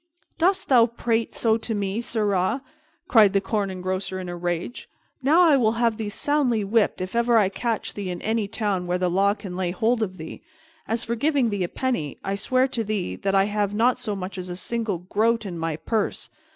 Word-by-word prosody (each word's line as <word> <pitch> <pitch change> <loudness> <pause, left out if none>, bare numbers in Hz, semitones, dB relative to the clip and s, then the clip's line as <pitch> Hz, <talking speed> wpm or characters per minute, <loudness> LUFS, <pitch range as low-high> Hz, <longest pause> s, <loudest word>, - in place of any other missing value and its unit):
"Doss 375 +3 +3
thou 240 -4 +5
prate 230 -1 -1
so 225 -1 +1
to 225 0 -3
me, 200 +2 -2
sirrah?" 210 +1 0 0.4
cried 215 - +6
the 200 - +4
Corn 205 -1 -1
Engrosser 185 0 -3
in 180 -1 -6
a 175 - -4
rage. 175 +6 -4 0.3
"Now 300 +7 +5
I 320 -4 +6
will 225 -4 +2
have 230 -1 +1
thee 220 -2 -3
soundly 250 -1 +1
whipped 205 -1 +1
if 185 +4 -5
ever 235 0 +3
I 205 -4 +4
catch 225 +2 -3
thee 200 -2 -5
in 180 - -4
any 220 -1 0
town 200 -4 -2
where 180 +1 +1
the 180 -1 0
law 200 +3 +3
can 195 -4 -8
lay 185 -1 -1
hold 225 +6 +1
of 185 -4 -2
thee! 160 -1 -8 0.5
As 225 +1 -1
for 230 - -2
giving 265 -1 +1
thee 200 -2 -1
a 175 - -2
penny, 240 - -2
I 195 - -2
swear 255 +6 +1
to 235 -3 -2
thee 210 -3 -2
that 195 0 -1
I 195 - +5
have 205 0 -1
not 240 +3 +3
so 220 -5 -2
much 185 0 -6
as 185 0 -6
a 175 - -4
single 220 0 -2
groat 220 +6 0
in 175 -4 -5
my 165 -1 -1
purse. 215 +6 -2
210 Hz, 220 wpm, -24 LUFS, 185-235 Hz, 0.5 s, cried